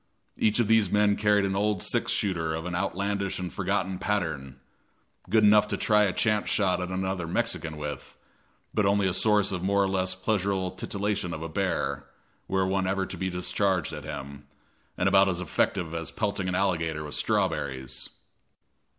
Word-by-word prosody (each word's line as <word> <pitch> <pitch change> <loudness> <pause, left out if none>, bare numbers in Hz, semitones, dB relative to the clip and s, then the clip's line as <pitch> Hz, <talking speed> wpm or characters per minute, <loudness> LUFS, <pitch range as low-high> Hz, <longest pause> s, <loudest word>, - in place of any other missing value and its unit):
Each 110 -1 +2
of 120 - +2
these 110 -3 +4
men 105 +1 +3
carried 105 -1 +3
an 95 0 -1
old 105 0 +1
six - - 0
shooter 85 -6 0
of 80 +1 -5
an 90 - -4
outlandish 100 +1 -1
and 90 -2 -5
forgotten 95 0 -1
pattern, 80 -10 -2 0.7
good 110 +2 +4
enough 105 0 +6
to - - -2
try 105 -1 +4
a 95 - +1
chance 105 +1 +1
shot 95 -3 +1
at 90 - -3
another 95 -2 -2
Mexican 80 -1 -1
with, 75 -3 -6 0.6
but 105 -2 +2
only 100 -1 +3
a 90 - 0
source 105 -1 +3
of 90 -2 -3
more 100 +2 +2
or - - +1
less 95 -1 0
pleasurable 95 -1 0
titillation 100 0 -2
to - - -3
a - - -5
bear, 80 -6 -1 0.4
were 95 0 +1
one 95 0 0
ever 95 0 0
to - - -6
be 95 - -2
discharged 90 -1 0
at - - -6
him, 70 +1 -7 0.5
and 95 - +1
about 95 0 +5
as 90 -2 -1
effective 90 -1 -1
as 85 0 -3
pelting 100 -3 -2
an 90 - -1
alligator 85 -5 0
with 75 - -7
strawberries. 65 -2 -1
95 Hz, 180 wpm, -27 LUFS, 85-100 Hz, 0.7 s, enough